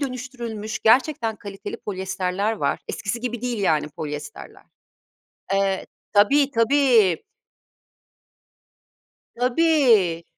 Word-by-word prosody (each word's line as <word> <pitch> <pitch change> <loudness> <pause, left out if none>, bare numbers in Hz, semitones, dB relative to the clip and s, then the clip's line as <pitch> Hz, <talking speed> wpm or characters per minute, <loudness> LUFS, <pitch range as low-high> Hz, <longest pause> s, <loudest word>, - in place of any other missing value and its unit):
dönüştürülmüş 240 -5 -5
gerçekten 230 -1 +2
kaliteli 200 -2 -8
polyesterler 190 +1 -2
var, 220 - -1
eskisi 220 +3 -4
gibi 240 -1 -4
değil 245 -2 -3
yani 160 -7 +1
polyesterler. 150 -1 -8 0.9
Eee, 195 -1 0 0.3
tabii, 275 +8 +4
tabii. 230 - +3 2.1
Tabii. 245 - +3
220 Hz, 80 wpm, -23 LUFS, 190-250 Hz, 2.1 s, tabii